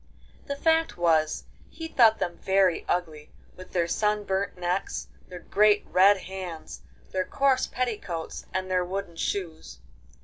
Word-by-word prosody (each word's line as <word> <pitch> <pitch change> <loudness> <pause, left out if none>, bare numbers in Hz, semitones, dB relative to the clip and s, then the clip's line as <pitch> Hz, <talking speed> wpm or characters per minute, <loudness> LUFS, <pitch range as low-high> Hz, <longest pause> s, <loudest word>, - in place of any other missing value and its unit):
The 280 - -2
fact 325 +2 +2
was 160 -3 +2 0.3
he 325 - -7
thought 230 -8 +5
them 175 - -3
very 190 -3 +2
ugly, 160 -4 -2 0.3
with 185 0 -12
their 170 -2 +1
sun 210 +3 0
burnt 195 -1 -2
necks, 180 +2 -2 0.2
their 180 - -9
great 210 +4 +3
red 195 +1 +5
hands, 185 -4 -7 0.3
their 185 0 0
coarse 270 +4 +1
petticoats 210 -9 -4
and 185 0 -3
their 180 -1 +2
wooden 185 -1 -5
shoes. 165 - -4
185 Hz, 140 wpm, -27 LUFS, 175-210 Hz, 0.3 s, thought